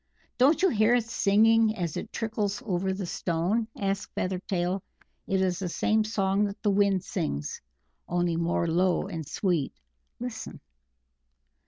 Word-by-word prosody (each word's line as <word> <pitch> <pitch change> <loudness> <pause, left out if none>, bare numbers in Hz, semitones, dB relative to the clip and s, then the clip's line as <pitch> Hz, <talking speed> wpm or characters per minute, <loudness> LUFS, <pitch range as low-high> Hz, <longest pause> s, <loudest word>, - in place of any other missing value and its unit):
"Don't 285 +8 +4
you 380 - +6
hear 220 -2 +4
it 245 - +2
singing 225 +1 +3
as 170 -5 -3
it - - -5
trickles 220 0 -2
over 190 -2 0
the 190 0 -3
stone?" 175 +7 -1
asked 195 0 -2
Feathertail. 185 0 -1 0.5
"It 190 -1 +1
is 180 -1 0
the 185 -2 -2
same 215 +5 +2
song 200 -2 +1
that 200 0 -5
the 205 - +3
Wind 195 -2 +2
sings, 155 - -3 0.5
only 175 -1 +1
more 170 +1 0
low 175 +2 +2
and 165 -6 -6
sweet.... 175 -8 0 0.5
Listen!" 245 -1 -6
195 Hz, 145 wpm, -28 LUFS, 175-215 Hz, 0.5 s, you